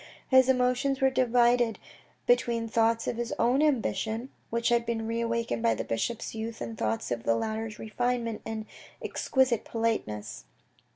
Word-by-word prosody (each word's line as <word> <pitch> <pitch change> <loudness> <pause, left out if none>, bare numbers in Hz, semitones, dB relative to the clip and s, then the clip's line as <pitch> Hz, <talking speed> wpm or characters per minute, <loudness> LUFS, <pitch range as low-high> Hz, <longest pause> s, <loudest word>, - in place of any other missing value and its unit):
His 260 -1 +6
emotions 255 +1 +2
were 265 0 +3
divided 240 -2 +3 0.5
between 235 - +2
thoughts 225 0 +2
of 230 - -2
his 240 -1 -3
own 250 +4 +3
ambition 240 -4 0 0.2
which 235 0 0
had 235 0 +3
been 230 -1 -2
re 230 +1 -1
awakened 230 - -1
by 115 0 +3
the - - -3
bishop's 225 - -3
youth 225 +1 -5
and 115 -1 -5
thoughts 110 +3 -2
of 120 -1 -1
the 115 0 +2
latter's 220 - -3
refinement 235 0 -2
and 220 -1 -5 0.3
exquisite 260 -4 +1
politeness. 225 - -2
230 Hz, 155 wpm, -28 LUFS, 220-245 Hz, 0.5 s, His